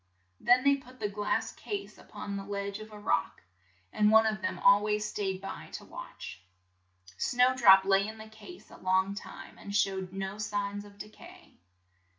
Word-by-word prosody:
Then 250 +1 +4
they 280 0 +4
put 255 -1 -16
the 210 - -1
glass 205 0 -1
case 405 -1 -6
up - - -19
on 200 - -5
the 195 - -4
ledge 200 0 -4
of 215 0 -10
a 210 - -10
rock, 205 - -1 0.5
and 210 0 +4
one 220 +1 +6
of 215 -2 -1
them - - -2
al 200 +1 +6
ways 210 0 0
stayed 195 -3 -2
by 195 - -7
it - - -17
to - - -7
watch. 90 +1 -9 0.8
Snow 250 - +3
drop 195 -6 +7
lay 195 +1 +3
in 220 +1 -7
the 220 0 -10
case 220 +12 -13
a - - -12
long 190 +1 +1
time 205 - -10
and 200 0 -6
showed 190 -2 0
no 195 +1 -5
signs 205 -1 -3
of 200 0 -15
de 210 - -8
cay. - - -16
205 Hz, 195 wpm, -30 LUFS, 195-220 Hz, 0.8 s, drop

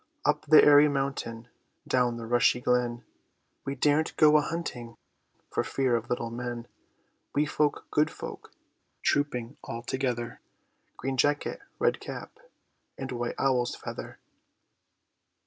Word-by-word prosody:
Up - - +1
the 155 - +8
airy 145 0 +7
mountain, 135 -5 -3 0.4
Down 125 -2 +2
the 115 - -6
rushy 120 +1 +3
glen, 120 -1 0 0.6
We 135 - -3
daren't 150 +3 +1
go 155 0 +6
a - - +4
hunting 125 -8 -5 0.5
For - - 0
fear 130 -3 +1
of 115 0 -3
little 120 -1 -2
men; 120 0 -5 0.7
Wee 145 +1 +3
folk, 150 0 0
good 150 - +3
folk, - - -9 0.5
Trooping 140 -3 0
all 115 +1 -6
together, 120 -2 -2 0.6
Green 135 0 -3
jacket, 145 +3 +1 0.2
red - - +1
cap, - - -8 0.6
And 135 -1 -5
white 120 -1 -3
owl's 125 -3 +1
feather! - - -7
125 Hz, 130 wpm, -28 LUFS, 120-145 Hz, 0.7 s, the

